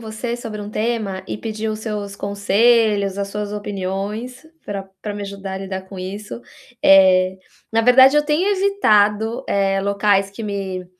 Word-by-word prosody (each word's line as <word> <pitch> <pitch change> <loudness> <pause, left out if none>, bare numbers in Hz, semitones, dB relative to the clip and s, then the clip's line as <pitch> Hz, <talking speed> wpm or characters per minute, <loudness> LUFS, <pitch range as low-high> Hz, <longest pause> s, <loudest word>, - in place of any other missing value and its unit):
você 230 +2 -5
sobre 220 -3 -7
um 205 0 -7
tema 215 -4 -2
e - - -3
pedir 220 0 -4
os 215 0 -4
seus 210 -2 -5
conselhos, 200 0 +2
as 200 0 -2
suas 210 0 -4
opiniões, 205 +6 -5 0.2
pra 195 -1 -6
pra 210 - -4
me 205 - -5
ajudar 195 -1 -6
a - - -4
lidar 190 -1 -5
com 190 0 -11
isso. 200 +5 -7 0.4
Eh, 185 -1 +5 0.3
na 225 0 +2
verdade 260 +4 +6
eu 295 - +3
tenho 310 +6 +1
evitado, 235 - +2
eh, 195 -1 +1
locais 200 0 +1
que 200 +3 -9
me, 195 -3 -4
205 Hz, 165 wpm, -20 LUFS, 195-225 Hz, 0.4 s, verdade